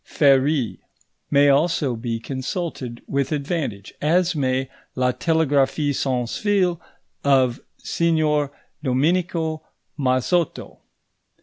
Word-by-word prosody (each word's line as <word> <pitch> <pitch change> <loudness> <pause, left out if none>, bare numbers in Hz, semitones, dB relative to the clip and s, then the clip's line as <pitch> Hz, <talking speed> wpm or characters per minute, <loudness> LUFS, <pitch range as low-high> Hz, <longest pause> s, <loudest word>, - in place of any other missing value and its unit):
Ferrié 140 -3 +2 0.5
may 145 0 +5
also 145 -2 +2
be 115 0 -3
consulted 130 -1 -5
with 140 +1 -1
advantage, 140 - -3
as 175 +3 +2
may 130 -2 0 0.3
La 125 -1 +2
Telegraphie 145 0 +1
sans 125 -3 -1
fil 190 -5 +1 0.4
of 130 -3 +3 0.2
Signor 155 -4 +1 0.3
Dominico 160 +3 0 0.4
Mazotto. 135 +6 0
140 Hz, 90 wpm, -22 LUFS, 130-160 Hz, 0.5 s, may